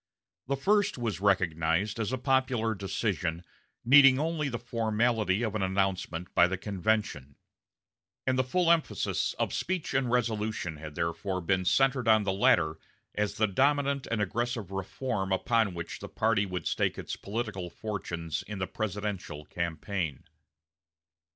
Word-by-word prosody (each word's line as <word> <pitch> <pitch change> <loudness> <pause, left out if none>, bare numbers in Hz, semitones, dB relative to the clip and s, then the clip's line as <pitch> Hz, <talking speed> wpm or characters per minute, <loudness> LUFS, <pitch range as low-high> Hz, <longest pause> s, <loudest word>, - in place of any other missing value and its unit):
The 140 +1 0
first 205 +6 +2
was 110 -7 -2
recognized 90 +1 +1
as 110 +1 -1
a 130 - 0
popular 130 -3 +1
decision 95 -4 -2 0.4
needing 135 +1 +8
only 155 -1 -1
the 120 - -3
formality 115 -3 0
of 110 -3 -1
an 110 - -1
announcement 95 -2 -1
by 85 - +6
the 95 +1 -2
convention; 100 -8 -1 0.9
and 130 - +2
the 130 - +2
full 170 +6 +2
emphasis 165 -2 +1
of - - -1
speech 185 -2 -2
and 130 -2 +1
resolution 110 -8 -1
had 75 0 -9
therefore 90 +4 -2
been 90 +1 0
centered 130 +3 +3
on 110 -1 +5
the 95 -1 0
latter 80 -5 +3 0.3
as 105 0 -1
the 110 - +3
dominant 140 +5 +1
and 110 -2 +1
aggressive 115 -1 -2
reform 95 +1 -3
upon 110 0 +1
which 85 0 -6
the - - -8
party 110 -2 +1
would 90 -1 -4
stake - - 0
its - - -5
political 100 -4 -4
fortunes 85 -6 -4
in 105 - -5
the 95 - -1
presidential 100 -7 -4
campaign. 85 -1 -3
105 Hz, 145 wpm, -29 LUFS, 90-120 Hz, 0.9 s, needing